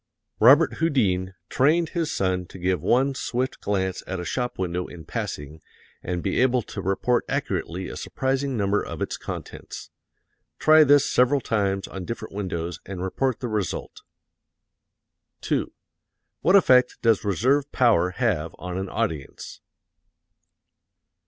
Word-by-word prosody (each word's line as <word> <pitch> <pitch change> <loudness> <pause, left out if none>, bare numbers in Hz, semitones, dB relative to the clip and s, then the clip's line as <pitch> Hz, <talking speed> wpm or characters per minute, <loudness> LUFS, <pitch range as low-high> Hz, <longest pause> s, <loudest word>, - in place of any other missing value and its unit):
Robert 140 +8 +6
Houdin 95 - +1
trained 160 +5 +2
his 165 -3 -2
son 90 -2 -1
to - - -11
give 90 -2 0
one 135 - +2
swift 130 -1 -3
glance 95 -2 -1
at 95 -1 -3
a 90 - -5
shop 125 +6 -2
window 90 -1 -2
in 80 -3 -11
passing 75 +2 -5 0.4
and 90 -1 -3
be - - +1
able 125 -2 +3
to 100 - -7
report 95 +6 +1
accurately 90 +2 -2
a - - -7
surprising 135 0 -2
number 100 0 +1
of - - -7
its - - -2
contents. - - -8 0.7
Try 155 0 +6
this 145 0 +5
several 125 +3 +3
times 100 -5 -1
on 95 -2 -7
different 110 -1 -6
windows 90 -4 -4
and 95 -1 -6
report 125 +6 -1
the 125 - -2
result. 105 -5 -3 1.4
2. - - -1 0.7
What 185 - +4
effect 130 -9 +5
does 115 -3 +3
reserve 130 - +1
power 105 -9 +3
have 90 -8 -1
on 90 +1 -5
an 95 0 -4
audience? 80 -12 -4
105 Hz, 140 wpm, -24 LUFS, 90-130 Hz, 1.4 s, Robert